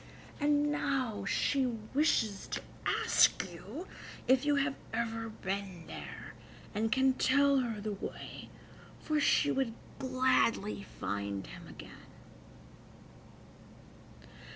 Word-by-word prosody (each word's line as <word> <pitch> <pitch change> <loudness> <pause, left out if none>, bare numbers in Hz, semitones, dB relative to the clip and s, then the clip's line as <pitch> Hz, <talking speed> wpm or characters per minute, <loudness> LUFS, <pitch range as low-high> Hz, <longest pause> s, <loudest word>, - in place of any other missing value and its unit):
And 295 0 +3
now 270 -7 -1
she 275 -2 +2 0.3
wishes 230 -9 +2
to - - -3 0.3
ask - - +4
you 350 - -7 0.4
if 260 +2 +4
you 290 - +4
have 280 0 +2 0.2
ever 225 0 -2
been 195 -4 -4
there, - - -8 0.4
and 220 +1 0
can 265 +2 +4
tell 280 +1 +4
her 230 -4 -2
the 215 +1 -3
way, 200 - -7 0.5
for 305 -1 0
she 285 - +4
would 260 -4 0 0.2
gladly 255 -6 +2
find 100 0 -2
him - - -10
again." - - -12
255 Hz, 105 wpm, -33 LUFS, 210-280 Hz, 0.5 s, ask